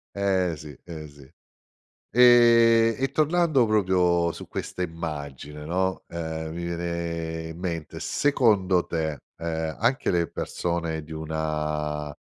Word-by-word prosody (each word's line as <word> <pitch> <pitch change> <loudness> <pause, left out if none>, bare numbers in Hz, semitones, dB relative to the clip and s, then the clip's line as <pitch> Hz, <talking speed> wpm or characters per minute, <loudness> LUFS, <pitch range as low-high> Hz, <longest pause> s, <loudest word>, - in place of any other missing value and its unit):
Eh 95 -3 +1
sì, 75 -4 -10
eh 80 -3 -7
sì. 70 0 -16 0.9
Ehm, 115 -2 +6
e 135 0 0
tornando 155 -4 +3
proprio 90 -5 +2
su - - -9
questa 90 - -4
immagine, 75 -3 -6
no, 95 +3 -1
ehm, 80 -1 -4
mi 85 0 -4
viene 85 -1 -3
in 80 - -9
mente 85 -4 -4
secondo 105 -11 +2
te, 80 -3 -2 0.2
ehm, 80 -1 -3
anche 125 +5 +1
le 85 -1 +2
persone 85 -2 -3
di 80 +1 -11
una 75 -1 -3
85 Hz, 120 wpm, -25 LUFS, 80-100 Hz, 0.9 s, Ehm